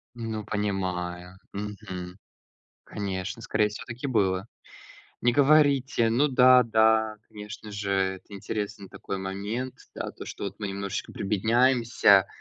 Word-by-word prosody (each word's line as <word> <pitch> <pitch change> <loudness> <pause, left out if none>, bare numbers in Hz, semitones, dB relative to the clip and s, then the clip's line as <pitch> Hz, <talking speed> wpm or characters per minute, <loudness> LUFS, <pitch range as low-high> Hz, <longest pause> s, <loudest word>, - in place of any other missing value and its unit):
Ну 110 -3 -4
понимаю, 95 -3 -3
мгм. 100 -3 -6 0.7
Конечно, 100 +1 -4
скорее 105 0 +1
всего, 105 - -8
так 120 - -7
и - - 0
было. 95 -4 +1 0.8
Не 120 - +4
говорите. 140 -5 +4
Ну 140 +6 +3
да, 130 -1 +7
да, 110 -1 +3
конечно 105 0 -9
же, 100 -1 -3
это 95 -1 0
интересный 100 0 -5
такой 95 - -6
момент, 100 +7 -4 0.2
да, - - -4
то, - - -10
что - - -7
вот 100 - -4
мы 105 - -3
немножечко 100 0 -4
прибедняемся, 115 0 +3
105 Hz, 130 wpm, -27 LUFS, 95-115 Hz, 0.8 s, да